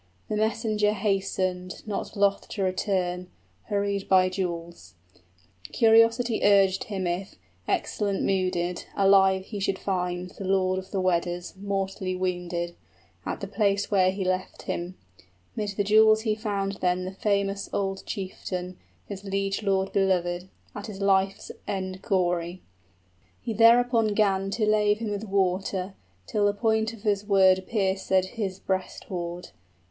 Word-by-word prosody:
The 215 - -1
messenger 215 -1 +1
hastened, 190 -3 -2
Not 210 +1 -4
loth 200 0 +1
to 200 - -3
return, 185 -1 -1 0.4
hurried 200 -1 -1
by 185 -1 +5
jewels: 170 - -5 0.8
Curiosity 230 +1 +4
urged 195 -2 +4
him 195 -3 -3
if, 175 +3 -3 0.3
excellent 200 -2 -1
mooded, 180 -2 0
Alive 195 -1 +5
he 205 -1 -6
should 195 0 0
find 180 -2 -2
the - - -9
lord 185 -1 +1
of 190 - -10
the 195 - -2
Weders 175 -1 0
35 - - -26
Mortally 195 -2 -2
wounded, 175 -2 -2 0.5
at - - -3
the 200 - -4
place 200 0 0
where 185 -2 +4
he 190 0 -3
left 185 0 -2
him. 175 +2 -4 0.6
'Mid 205 -2 -3
the 205 - +2
jewels 215 +1 +5
he 220 -1 +1
found 200 -2 -2
then 180 0 +1
the 185 - -4
famous 200 0 -1
old 195 -1 -2
chieftain, 185 -2 -5 0.3
His 200 -2 -7
liegelord 195 0 -1
belovèd, 180 -2 +1 0.3
at 205 +1 -7
his 200 -3 -8
life's 195 0 +1 0.2
end 190 -1 -3
gory: 180 -3 -1 0.8
He 230 - -4
thereupon 230 -1 +4
'gan 195 -2 +2
to 215 +2 0
lave 210 -1 +3
him 220 -1 -4
with 205 +1 -3
water, 190 -1 0 0.3
Till 205 - +1
the 205 - +2
point 220 +1 +1
of 225 -2 -13
his 205 -2 +1
word 190 -2 +4
piercèd 190 -3 +1
his 195 -3 -4
breast 190 -1 -3
hoard. 175 -1 -5
195 Hz, 140 wpm, -26 LUFS, 185-205 Hz, 0.8 s, by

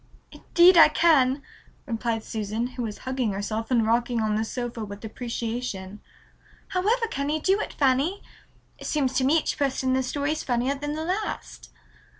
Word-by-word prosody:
"Indeed 350 +1 +5
I 330 - +10
can," 285 -5 +3 0.4
replied 230 -1 -2
Susan, 215 +1 -3
who 255 - -6
was 220 -3 -4
hugging 255 -5 -1
herself 215 +3 -3
and 235 -4 +3
rocking 235 +1 +1
on 215 -1 0
the 215 +1 0
sofa 240 0 -4
with 200 +1 -8
appreciation. 225 -4 -5 0.7
"However 430 +6 +1
can 280 +1 -2
you 310 +1 0
do 385 +6 +2
it, - - -3
Fanny? 280 +8 +1 0.6
It - - -7
seems 275 -4 0
to 260 - +2
me 285 +5 +4
each 310 - -2
person 265 -2 0
in - - +3
the 260 - +2
story 285 +3 -2
is 310 - -2
funnier 250 +2 0
than 290 +1 -4
the 315 +1 -4
last." 390 +5 -4
255 Hz, 175 wpm, -25 LUFS, 225-295 Hz, 0.7 s, I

